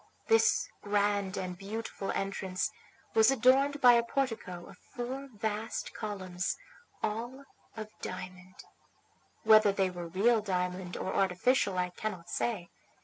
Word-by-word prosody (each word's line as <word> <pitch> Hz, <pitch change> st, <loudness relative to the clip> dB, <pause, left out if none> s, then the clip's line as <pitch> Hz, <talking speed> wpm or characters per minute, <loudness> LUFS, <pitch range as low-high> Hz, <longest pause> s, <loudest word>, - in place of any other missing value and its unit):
This 450 Hz, 0 st, +4 dB
grand 205 Hz, -1 st, +1 dB
and 180 Hz, -1 st, -3 dB
beautiful 200 Hz, +1 st, -5 dB
entrance 190 Hz, -1 st, -2 dB, 0.4 s
was 220 Hz, +1 st, +6 dB
adorned 270 Hz, +3 st, +4 dB
by 245 Hz, -1 st, +9 dB
a 235 Hz, -, +5 dB
portico 225 Hz, -9 st, -2 dB
of -, -, -14 dB, 0.2 s
four 260 Hz, +3 st, -4 dB
vast 215 Hz, 0 st, -3 dB
columns, 190 Hz, -4 st, -3 dB, 0.5 s
all 240 Hz, +6 st, -3 dB, 0.3 s
of 215 Hz, -1 st, -6 dB
diamond. 185 Hz, 0 st, -7 dB, 0.9 s
Whether 215 Hz, -1 st, +7 dB
they 195 Hz, -1 st, +1 dB
were 175 Hz, -1 st, -6 dB
real 215 Hz, +6 st, +3 dB
diamond 180 Hz, -2 st, -2 dB
or 190 Hz, -, -3 dB
artificial 195 Hz, +2 st, +2 dB
I 180 Hz, 0 st, 0 dB
cannot 180 Hz, -3 st, -5 dB
say. 200 Hz, -8 st, -2 dB
205 Hz, 125 wpm, -31 LUFS, 185-235 Hz, 0.9 s, by